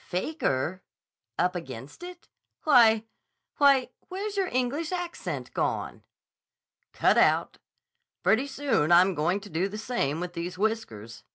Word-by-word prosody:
"'Faker'? 185 - -2 0.6
'Up 180 +1 +1
against 135 - -8
it'? 355 0 -10 0.4
Why—why, 250 +2 +3 0.2
where's 400 +3 -4
your 390 -2 0
English 270 +6 -1
accent 355 -1 -5
gone?" - - -2 0.9
"Cut - - +3
out. - - +2 0.6
Pretty 255 +6 +3
soon 265 - 0
I'm 180 +2 +6
going 170 +5 0
to 205 - -11
do 170 +5 0
the 210 - -6
same 215 - -2
with 175 0 -5
these 175 +2 -5
whiskers. 115 - -3
215 Hz, 120 wpm, -27 LUFS, 170-280 Hz, 0.9 s, I'm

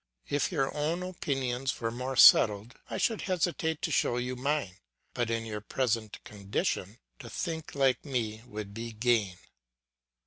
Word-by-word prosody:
If 145 +4 0
your 135 -6 0
own 160 +4 -1
opinions 135 -7 -2
were 115 -1 -1
more 130 +3 -4
settled 105 -2 +7 0.2
I - - -3
should 225 -3 +1
hesitate 175 -3 -1
to - - 0
show 120 - +2
you 125 +1 -2
mine; 135 -7 -1 0.4
but 120 -1 -1
in 115 0 -1
your 105 -1 -5
present 115 -1 -2
condition, 100 - -3 0.2
to - - -9
think 160 -5 -4
like 135 -3 +2
me 115 -6 -2
would 105 -3 -7
be 115 +1 -6
gain. 110 -5 +1
125 Hz, 150 wpm, -30 LUFS, 110-145 Hz, 0.4 s, settled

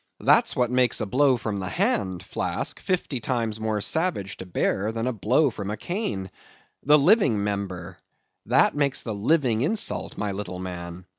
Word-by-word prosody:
That's - - +4
what 125 -1 +1
makes 125 -2 +2
a - - -1
blow 130 +4 +3
from 110 -3 -3
the 95 -2 -4
hand, 95 -4 -1
Flask, - - -3
fifty 175 -8 -2
times 115 -3 -2
more 110 -1 -1
savage 130 - -1
to 95 - -8
bear 100 +3 0
than 115 +1 -3
a 130 - 0
blow 125 +7 +2
from 100 -2 -6
a 105 - -3
cane. 105 - -4 0.5
The 150 +2 +6
living 145 - +3
member—that 95 0 -2
makes 140 -2 +1
the 110 - -4
living 115 +1 +1
insult, 200 - 0
my 105 -1 -2
little 95 -2 -5
man. 90 -1 -7
110 Hz, 165 wpm, -25 LUFS, 100-135 Hz, 0.5 s, The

